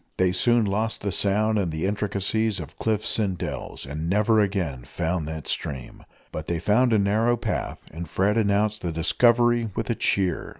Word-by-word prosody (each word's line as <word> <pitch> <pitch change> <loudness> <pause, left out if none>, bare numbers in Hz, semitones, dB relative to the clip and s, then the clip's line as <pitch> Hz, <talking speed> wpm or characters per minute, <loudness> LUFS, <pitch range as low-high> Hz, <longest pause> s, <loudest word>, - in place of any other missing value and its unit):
They 95 -1 +3
soon 120 +4 +3
lost 110 +3 -1
the 100 - -2
sound 105 +3 +1
in 95 -4 0
the 80 +2 -3
intricacies 105 +1 0
of 80 - -8
cliffs 110 0 0
and 95 -4 0
dells, - - -5
and 75 +4 -4
never 105 +3 +3
again 95 -11 -1
found 80 +4 -2
that 80 -1 -6
stream. 65 -4 -5 0.3
But 75 - -6
they 85 - -1
found 110 +9 +2
a 110 - +4
narrow 110 +4 +2
path, 110 -2 -3
and 80 +1 -7
Fred 100 +5 +1
announced 105 0 +1
the 85 - -2
discovery 120 +7 +3
with 115 0 -2
a - - 0
cheer. 95 -4 0
100 Hz, 180 wpm, -25 LUFS, 85-110 Hz, 0.3 s, a